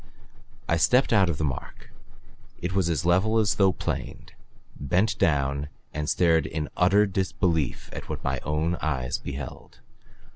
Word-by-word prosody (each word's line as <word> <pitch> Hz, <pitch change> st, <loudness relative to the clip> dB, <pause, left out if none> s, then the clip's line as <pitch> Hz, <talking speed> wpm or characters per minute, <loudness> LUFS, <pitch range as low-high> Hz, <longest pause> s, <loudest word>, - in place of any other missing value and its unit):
I 85 Hz, -, +2 dB
stepped 125 Hz, -, +3 dB
out 95 Hz, -5 st, +4 dB
upon 80 Hz, -, -2 dB
the 80 Hz, -, -2 dB
mark. -, -, -11 dB, 0.7 s
It 90 Hz, +1 st, -3 dB
was 95 Hz, -3 st, +1 dB
as 80 Hz, -2 st, -1 dB
level 95 Hz, +6 st, +3 dB
as 110 Hz, -4 st, +3 dB
though 95 Hz, -1 st, +6 dB
planed; -, -, -5 dB, 0.4 s
bent 90 Hz, +10 st, +1 dB
down 70 Hz, -1 st, +1 dB, 0.3 s
and 75 Hz, 0 st, -3 dB
stared 80 Hz, -4 st, +3 dB
in 75 Hz, -3 st, -4 dB
utter 100 Hz, +4 st, +4 dB
disbelief 90 Hz, -6 st, -1 dB
of -, -, -8 dB
what -, -, -5 dB
my 65 Hz, 0 st, -1 dB
own 80 Hz, +5 st, -1 dB
eyes 65 Hz, -5 st, -1 dB
beheld. 70 Hz, +1 st, -8 dB
85 Hz, 150 wpm, -26 LUFS, 75-95 Hz, 0.7 s, though